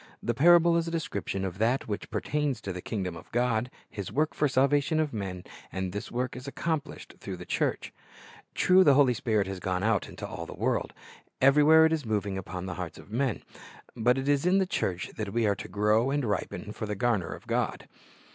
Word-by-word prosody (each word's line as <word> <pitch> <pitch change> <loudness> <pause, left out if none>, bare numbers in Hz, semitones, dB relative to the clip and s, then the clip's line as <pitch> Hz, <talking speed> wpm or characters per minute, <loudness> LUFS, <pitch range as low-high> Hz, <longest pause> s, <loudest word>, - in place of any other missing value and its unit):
The 120 - 0
parable 170 +5 +6
is 170 0 0
a - - -1
description 100 - -3
of 95 0 -5
that 120 +5 +1
which 105 -2 -4
pertains 150 -5 -1
to 95 - -4
the 90 - -6
kingdom 95 -5 -3
of - - -12
God, 120 0 +1 0.2
His 100 -3 -6
work 155 +3 +1
for - - +1
the - - +2
salvation 140 +4 +2
of 155 -4 0
men, 95 -4 -4 0.3
and 95 -1 -3
this 105 - -6
work 125 +2 -2
is 125 +2 -8
accomplished 155 +1 -4
through - - -6
the - - -9
church. - - -1 0.6
True, 185 +1 +5
the 145 -5 +6
Holy 135 -3 +5
Spirit 110 -4 0
has 95 -1 -5
gone 90 0 -2
out 110 -2 +1
into - - -7
all - - -7
the - - -8
world; - - -1 0.5
every 135 +3 +6
where 160 +2 +7
it 160 - +3
is 155 -2 -1
moving 105 -3 -1
upon 90 -1 -5
the 95 - -4
hearts - - -6
of - - -14
men; 125 0 -1 0.5
but 120 +3 +2
it 135 +1 -3
is 145 -1 +2
in 180 +2 +3
the 190 - +3
church 95 - -2
that 105 -2 -4
we 115 -1 +2
are 100 - +3
to - - -8
grow 105 +4 +2
and 140 -1 0
ripen 105 -1 -3
for 110 - -5
the 105 - -2
garner 105 -3 0
of - - -9
God. - - -2
120 Hz, 220 wpm, -28 LUFS, 100-145 Hz, 0.6 s, where